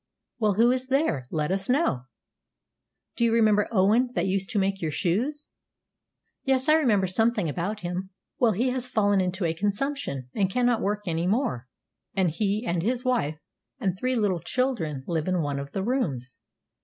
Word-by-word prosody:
"Well, 215 Hz, -3 st, +2 dB
who 235 Hz, +4 st, +5 dB
is 255 Hz, 0 st, -1 dB
there? 260 Hz, -, 0 dB
Let 150 Hz, +1 st, -1 dB
us 195 Hz, +2 st, -2 dB
know." 250 Hz, -, +1 dB, 1.1 s
"Do -, -, 0 dB
you 230 Hz, -, +3 dB
remember 215 Hz, -2 st, +3 dB
Owen, 220 Hz, +5 st, +3 dB
that -, -, +1 dB
used 195 Hz, 0 st, -1 dB
to 215 Hz, -, -2 dB
make 195 Hz, 0 st, 0 dB
your 160 Hz, -, -1 dB
shoes?" 230 Hz, -, -1 dB, 0.9 s
"Yes, 265 Hz, 0 st, +1 dB
I 305 Hz, -, +6 dB
remember 235 Hz, -12 st, +3 dB
something 215 Hz, 0 st, +2 dB
about 180 Hz, +8 st, -3 dB
him." 180 Hz, +2 st, -4 dB, 0.3 s
"Well, 230 Hz, -3 st, +4 dB
he 240 Hz, +7 st, +1 dB
has 255 Hz, -1 st, -1 dB
fallen 205 Hz, -5 st, +2 dB
into 185 Hz, 0 st, -1 dB
a 165 Hz, -, +1 dB
consumption, 205 Hz, -, -2 dB
and 195 Hz, -3 st, +1 dB
cannot 245 Hz, +2 st, +1 dB
work 210 Hz, +1 st, -1 dB
any 170 Hz, 0 st, -1 dB
more; 195 Hz, -, 0 dB, 0.5 s
and 185 Hz, -4 st, +2 dB
he, 205 Hz, +6 st, -1 dB
and 170 Hz, -5 st, 0 dB
his 245 Hz, +6 st, -1 dB
wife, 195 Hz, -, 0 dB, 0.4 s
and 190 Hz, -3 st, 0 dB
three 255 Hz, +6 st, -1 dB
little 205 Hz, -6 st, +1 dB
children 170 Hz, -, -2 dB
live 165 Hz, -2 st, -2 dB
in 180 Hz, -3 st, +1 dB
one 140 Hz, -1 st, -2 dB
of 140 Hz, 0 st, -7 dB
the 190 Hz, -, -2 dB
rooms." 145 Hz, -, -2 dB
200 Hz, 180 wpm, -26 LUFS, 175-245 Hz, 1.1 s, I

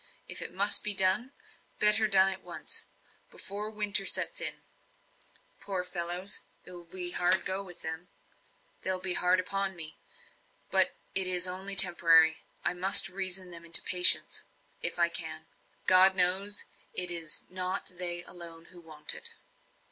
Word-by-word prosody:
If -, -, -3 dB
it -, -, -6 dB
must 200 Hz, +3 st, +1 dB
be 210 Hz, -1 st, +1 dB
done 190 Hz, +7 st, 0 dB, 0.5 s
better 210 Hz, +1 st, +4 dB
done 195 Hz, -1 st, +2 dB
at 185 Hz, -, -14 dB
once, -, -, -6 dB, 0.4 s
before 205 Hz, +2 st, -8 dB
winter 210 Hz, -2 st, -1 dB
sets -, -, 0 dB
in. -, -, -3 dB, 1.0 s
Poor 195 Hz, -2 st, -7 dB
fellows! 180 Hz, +1 st, -2 dB, 0.2 s
it -, -, -7 dB
will 175 Hz, -1 st, -11 dB
go 175 Hz, +1 st, -1 dB
hard 180 Hz, +2 st, -1 dB, 0.2 s
with 175 Hz, -, -12 dB
them 160 Hz, +2 st, -8 dB, 0.7 s
they'll 185 Hz, 0 st, -2 dB
be 185 Hz, -1 st, -1 dB
hard 180 Hz, +1 st, 0 dB
upon 195 Hz, +1 st, -5 dB
me. 155 Hz, -3 st, -3 dB, 0.7 s
But -, -, +3 dB, 0.2 s
it 190 Hz, -1 st, +6 dB
is 180 Hz, 0 st, -1 dB
only 190 Hz, +2 st, -4 dB
temporary; 165 Hz, -3 st, +6 dB, 0.3 s
I -, -, -2 dB
must 185 Hz, +2 st, +5 dB
reason 185 Hz, -1 st, -3 dB
them 170 Hz, -1 st, -9 dB
into 170 Hz, 0 st, +8 dB
patience, 180 Hz, -1 st, +4 dB, 0.4 s
if -, -, +1 dB
I -, -, +1 dB
can; -, -, -6 dB, 0.4 s
God 185 Hz, +1 st, +4 dB
knows, 190 Hz, +3 st, +1 dB, 0.3 s
it 180 Hz, -1 st, +2 dB
is 165 Hz, -2 st, -4 dB
not 185 Hz, +1 st, -5 dB
they 175 Hz, -1 st, -1 dB
alone 170 Hz, -2 st, -12 dB
who 175 Hz, -, -17 dB
want 155 Hz, -2 st, -6 dB
it." -, -, -5 dB
185 Hz, 150 wpm, -26 LUFS, 175-195 Hz, 1.0 s, into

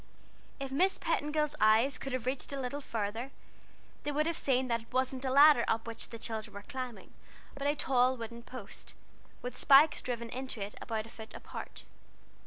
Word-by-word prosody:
If 275 Hz, -1 st, -4 dB
Miss 365 Hz, +8 st, +3 dB
Petingill's 300 Hz, 0 st, 0 dB
eyes 220 Hz, +6 st, +4 dB
could 270 Hz, -, -5 dB
have 255 Hz, -2 st, -2 dB
reached 255 Hz, +2 st, -1 dB
a 280 Hz, -, -3 dB
little 270 Hz, +3 st, -3 dB
farther, 225 Hz, +1 st, -3 dB, 0.7 s
they 295 Hz, -, -2 dB
would 300 Hz, +1 st, +1 dB
have 335 Hz, 0 st, 0 dB
seen 260 Hz, -3 st, +1 dB
that 235 Hz, -1 st, 0 dB
it 225 Hz, -, -20 dB
wasn't 260 Hz, +1 st, 0 dB
a -, -, +1 dB
ladder 280 Hz, -1 st, +7 dB
up 225 Hz, 0 st, 0 dB
which 230 Hz, -1 st, -6 dB
the 230 Hz, -, -7 dB
children 220 Hz, -2 st, -5 dB
were 200 Hz, -, -7 dB
climbing, 255 Hz, -5 st, -7 dB, 0.4 s
but 280 Hz, 0 st, -3 dB
a 290 Hz, -, +2 dB
tall 255 Hz, -2 st, +2 dB
wooden 235 Hz, 0 st, -7 dB
post, 255 Hz, +2 st, -10 dB, 0.5 s
with 250 Hz, 0 st, -5 dB
spikes 290 Hz, +2 st, +6 dB
driven 235 Hz, -2 st, -4 dB
into 260 Hz, -2 st, -4 dB
it 200 Hz, +1 st, -4 dB
about 220 Hz, -2 st, -3 dB
a -, -, -12 dB
foot 220 Hz, -1 st, -10 dB
apart. -, -, -8 dB
255 Hz, 190 wpm, -32 LUFS, 230-280 Hz, 0.7 s, ladder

